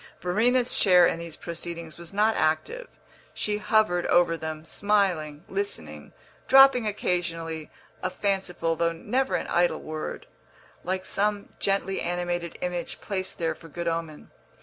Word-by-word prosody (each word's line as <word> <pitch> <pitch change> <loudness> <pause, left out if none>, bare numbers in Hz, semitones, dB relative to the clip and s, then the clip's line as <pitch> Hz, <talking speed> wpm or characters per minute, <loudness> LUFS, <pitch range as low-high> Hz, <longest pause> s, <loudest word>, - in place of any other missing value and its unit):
Verena's 235 +7 +2
share 180 -3 +6
in 165 - 0
these 170 -2 -7
proceedings 170 -1 -6
was 170 -1 -5
not 215 +2 +2
active; 160 - 0 0.5
she 210 0 -1
hovered 210 -5 +2
over 175 -1 +4
them, 160 -1 -6
smiling, 175 -7 0
listening, 80 - -4 0.4
dropping 270 -4 +7
occasionally 165 -5 -2 0.3
a 185 - -1
fanciful 185 -3 -1
though 170 +1 +1
never 260 +10 -1
an - - -1
idle 175 0 +2
word, 155 0 -6 0.6
like 185 +1 -2
some 205 0 -1
gently 195 -1 0
animated 175 -1 -2
image 180 -1 -3
placed 190 -2 -3
there 165 -1 0
for 165 - -14
good 170 +2 -5
omen. 165 -2 -4
175 Hz, 135 wpm, -26 LUFS, 165-200 Hz, 0.6 s, dropping